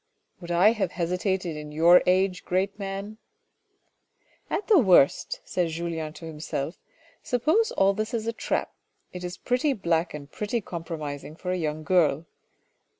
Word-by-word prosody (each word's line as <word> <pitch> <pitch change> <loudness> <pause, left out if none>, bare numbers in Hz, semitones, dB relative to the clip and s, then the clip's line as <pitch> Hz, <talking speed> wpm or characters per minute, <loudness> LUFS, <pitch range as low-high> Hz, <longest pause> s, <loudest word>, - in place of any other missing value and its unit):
" - - -43
Would 170 - -9
I 175 +5 +5
have 215 -3 -2
hesitated 180 0 -1
in 150 0 -7
your 170 +4 +6
age 185 0 +2
great 195 +3 -1
man? 200 +2 -5 0.4
" - - -46
" - - -50 0.3
At 420 - -2
the 420 -6 +6
worst," 185 - +4
said 180 -2 0
Julien 165 -1 -4
to 165 - -10
himself, 155 -1 -5 0.2
" - - -29
suppose 315 - +2
all 195 +1 +3
this 215 +3 -3
is 230 -3 -2
a 230 - -1
trap, - - -2 0.4
it 180 0 -7
is 180 +1 -5
pretty 255 +3 +1
black 170 -6 0
and 145 -1 -9
pretty 210 +3 -2
compromising 160 -6 -6
for 180 +2 -4
a - - +1
young 155 -3 -3
girl. 165 -3 +2
180 Hz, 170 wpm, -26 LUFS, 160-205 Hz, 0.4 s, your